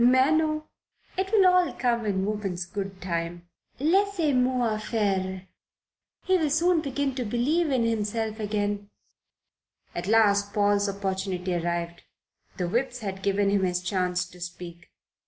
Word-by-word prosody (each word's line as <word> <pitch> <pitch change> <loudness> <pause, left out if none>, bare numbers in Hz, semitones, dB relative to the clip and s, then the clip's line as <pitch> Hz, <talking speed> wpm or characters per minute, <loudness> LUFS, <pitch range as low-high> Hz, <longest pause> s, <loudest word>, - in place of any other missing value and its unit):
"Mais 260 +4 +5
non. 310 -1 +1 0.5
It 380 +1 -2
will 415 -4 +5
all 365 -1 +4
come 235 -3 0
in 190 -1 0
woman's 195 -4 -2
good 195 -1 -5
time. 170 -1 -3 0.3
Laissez 345 0 +2
moi 250 -3 +1
faire. 190 -4 -1 0.8
He 375 -1 +3
will 310 -2 +1
soon 330 +3 +3
begin 280 -1 -1
to 250 -1 -2
believe 275 +9 +1
in 255 -4 +2
himself 220 0 -1
again." 205 -1 -2 1.0
At 175 - -4
last 205 -2 +3
Paul's 205 -1 +3
opportunity 190 -2 -2
arrived. 170 0 -2 0.6
The 180 - -1
Whips 245 +5 -1
had 195 -2 -5
given 200 0 +1
him 200 -1 +2
his 180 -1 +1
chance 180 -1 0
to 180 - -15
speak. 175 -1 -8
205 Hz, 140 wpm, -26 LUFS, 190-260 Hz, 1.0 s, Mais